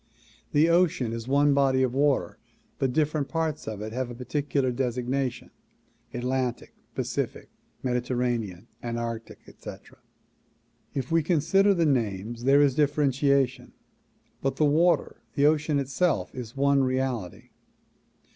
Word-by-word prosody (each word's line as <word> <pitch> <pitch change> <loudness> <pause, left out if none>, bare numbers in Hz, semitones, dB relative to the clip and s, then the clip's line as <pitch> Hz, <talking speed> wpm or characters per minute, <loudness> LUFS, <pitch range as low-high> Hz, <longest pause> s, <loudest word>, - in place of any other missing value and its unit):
The 150 +2 +4
ocean 170 -9 +2
is 115 0 -5
one 140 +2 +4
body 135 -2 +3
of 125 -2 0
water 135 -9 +1 0.4
but 135 -2 +1
different 150 0 0
parts 160 -2 -2
of 105 -1 -4
it 110 +1 -6
have 125 -1 -3
particular 135 +1 -1
designation, 125 0 -2 0.6
Atlantic, 125 0 -2 0.2
Pacific, - - -3 0.3
Mediterranean, 120 -6 -1 0.2
Antarctic, 115 -1 -5
etc. - - -12 1.0
If 135 0 -3
we 165 0 +4
consider 190 +5 +3
the 170 -2 +2
names, 115 -3 -1
there 140 +2 +6
is 140 -2 +3
differentiation, 140 -3 +1 0.7
but 135 0 0
the 155 - +2
water, 165 +4 +2
the 145 - +3
ocean 155 0 +2
itself 140 +6 0
is 125 0 -8
one 140 0 +3
reality. 130 -7 -2
135 Hz, 120 wpm, -27 LUFS, 120-145 Hz, 1.0 s, there